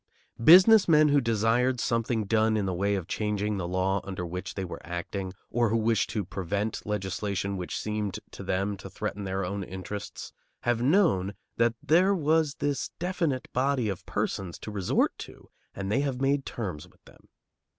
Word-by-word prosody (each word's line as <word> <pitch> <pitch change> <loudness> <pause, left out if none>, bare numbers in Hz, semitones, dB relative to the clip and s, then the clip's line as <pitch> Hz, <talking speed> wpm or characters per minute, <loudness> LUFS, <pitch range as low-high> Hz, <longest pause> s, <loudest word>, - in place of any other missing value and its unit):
Business 190 - +8
men 155 -2 +6
who 145 0 +4
desired 115 +2 +2
something 115 -2 0
done 110 +1 +2
in 105 - 0
the 95 - -1
way 100 +3 +1
of 95 -4 -4
changing 105 -1 -1
the 90 -3 -3
law 95 +2 0
under 95 -2 -5
which 90 +2 -6
they 95 - -3
were 85 - -7
acting, 90 +3 -4 0.2
or 120 -1 +2
who 115 - +2
wished 110 -1 +1
to 105 -4 -2
prevent 100 +3 -3
legislation 100 -1 -2
which 90 -2 -4
seemed 105 -2 -3
to - - -9
them 100 +2 -1
to 95 0 -9
threaten 105 0 -4
their 95 0 -2
own 100 +2 -3
interests, 95 +2 -7 0.3
have 120 -1 0
known 125 - +3 0.2
that 115 0 +3
there 185 +5 +4
was 155 -3 +2
this 145 -1 -2
definite 165 -6 -1
body 130 -3 +1
of 95 -3 -4
persons 90 -3 -2
to 105 - -8
resort 100 -3 +1
to, - - -11 0.2
and 100 0 -4
they 130 - +2
have 135 -3 -2
made 135 +1 +1
terms 90 -10 -5
with - - -29
them. - - -19
105 Hz, 180 wpm, -28 LUFS, 95-130 Hz, 0.3 s, Business